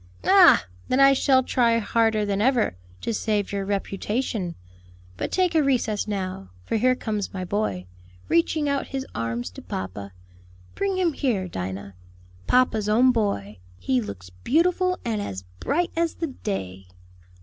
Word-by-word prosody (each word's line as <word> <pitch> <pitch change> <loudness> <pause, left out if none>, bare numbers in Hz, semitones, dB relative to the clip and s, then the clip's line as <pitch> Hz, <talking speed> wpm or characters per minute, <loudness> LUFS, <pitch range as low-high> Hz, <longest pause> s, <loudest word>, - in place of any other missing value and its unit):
"Ah! - - +7 0.2
then 255 - +1
I 275 0 +7
shall 260 -1 +3
try 235 -2 +2
harder 225 -1 +1
than 200 0 -1
ever, 240 - +2 0.3
to 230 - -2
save 210 -2 -1
your 200 -1 -2
reputation; 200 0 -2 0.6
but - - -4
take 365 -2 +2
a 320 - +4
recess 245 -7 0
now, 185 - -4 0.2
for - - -2
here 255 +3 +3
comes 210 -5 -3
my 185 -1 -3
boy, 175 - -2 0.4
reaching 290 - +2
out 280 -1 -1
his 270 -1 -4
arms 115 -2 -3
to 90 - -10
papa. 95 +2 -6 0.6
Bring 395 -1 -1
him 350 -4 +1
here 220 -10 -1
Dinah. 95 - -5 0.5
Papa's 225 -5 +2
own 245 +4 +5
boy, 105 - -2 0.2
he 125 +7 0
looks 95 -4 -8
beautiful 360 +5 +2
and 220 -3 -1
as 95 - -5 0.2
bright 340 - 0
as 335 0 0
the 330 - -2
day." 95 - -5
210 Hz, 150 wpm, -24 LUFS, -, 0.6 s, Ah